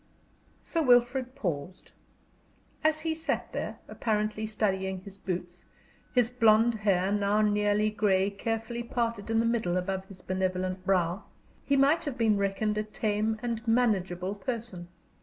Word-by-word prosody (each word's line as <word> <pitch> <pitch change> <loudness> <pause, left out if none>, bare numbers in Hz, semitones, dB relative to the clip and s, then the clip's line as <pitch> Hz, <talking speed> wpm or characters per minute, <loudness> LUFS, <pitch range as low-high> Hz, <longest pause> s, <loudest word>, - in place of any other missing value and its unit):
Sir 330 - -1
Wilfrid 250 -1 +3
paused. 180 - -4 0.9
As 310 0 +2
he 320 0 0
sat 320 0 -2
there, - - -4
apparently 215 -1 -1
studying 190 -3 -1
his 195 +1 -12
boots, 175 -2 -5 0.5
his 245 -2 +4
blond 230 -1 +4
hair, 200 -3 +1
now 205 +1 +2
nearly 210 0 +2
gray, 200 -2 +2
carefully 225 +3 -3
parted 230 -3 -2
in 225 - +1
the 230 - +2
middle 225 -7 +1
above 190 +1 -2
his 190 -1 -14
benevolent 185 0 -2
brow, 185 0 +1 0.4
he 280 - +2
might 280 +4 +4
have 280 -4 -4
been 220 -3 +3
reckoned 210 +2 0
a - - 0
tame 215 0 -1
and 235 -1 -3
manageable 195 -6 +1
person. 215 -5 -5
210 Hz, 140 wpm, -29 LUFS, 190-235 Hz, 0.9 s, his